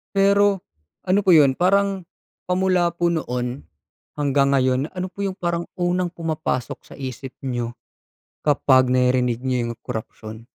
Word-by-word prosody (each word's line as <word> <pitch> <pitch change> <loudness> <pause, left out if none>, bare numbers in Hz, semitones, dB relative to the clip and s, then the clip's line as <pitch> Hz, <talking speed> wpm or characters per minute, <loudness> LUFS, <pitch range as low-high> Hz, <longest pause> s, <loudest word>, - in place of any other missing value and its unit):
Pero 200 0 +4 0.5
ano 195 +3 +3
po 190 - +3
'yon 145 -5 +6
parang 195 +3 +2 0.4
pa 180 0 -1
mula 185 -2 +2
po 175 0 -1
noon 125 -6 -2 0.6
hanggang 140 -1 +2
ngayon, 130 +2 +1
ano 185 0 -4
po 200 +2 -7
yung 195 -1 -3
parang 170 -1 -2
unang 175 0 0
pumapasok 160 -7 -3
sa - - -15
isip 130 0 -6 0.2
niyo 120 -2 -3 0.6
kapag 130 -3 +3
naririnig 125 -1 +2
niyo 125 -2 0
yung 115 - -5
korapsiyon? 110 -1 -7
150 Hz, 140 wpm, -22 LUFS, 125-180 Hz, 0.6 s, yon